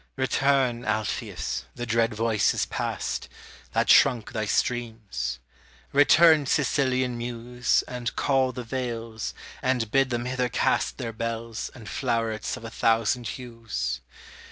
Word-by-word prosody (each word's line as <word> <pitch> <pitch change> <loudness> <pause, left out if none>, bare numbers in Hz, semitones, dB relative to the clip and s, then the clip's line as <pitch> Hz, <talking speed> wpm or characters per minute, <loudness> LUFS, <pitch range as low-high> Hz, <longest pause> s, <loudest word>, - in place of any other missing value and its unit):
Return, 130 -2 +2
Alpheus, 110 -1 -2
the 120 - -4
dread 115 -1 +1
voice 110 -1 +2
is - - +1
past, - - -3 0.4
That - - +2
shrunk 115 -4 +5
thy 110 -1 -2
streams; 110 - -1 0.6
return, 145 +1 +6
Sicilian 130 -4 +1
muse, 120 +1 0
And 125 -2 -4
call 135 -2 +2
the 125 0 -6
vales, 115 -3 -4 0.3
and 125 -4 0
bid 135 -1 +3
them 120 -1 -2
hither 125 -1 -1
cast - - +1
Their 115 - -4
bells, 115 0 -4
and 115 -5 -11
flowerets 115 -4 -1
of 115 - -10
a 115 - -7
thousand 115 +1 +1
hues. 110 - -4
120 Hz, 130 wpm, -26 LUFS, 115-130 Hz, 0.6 s, return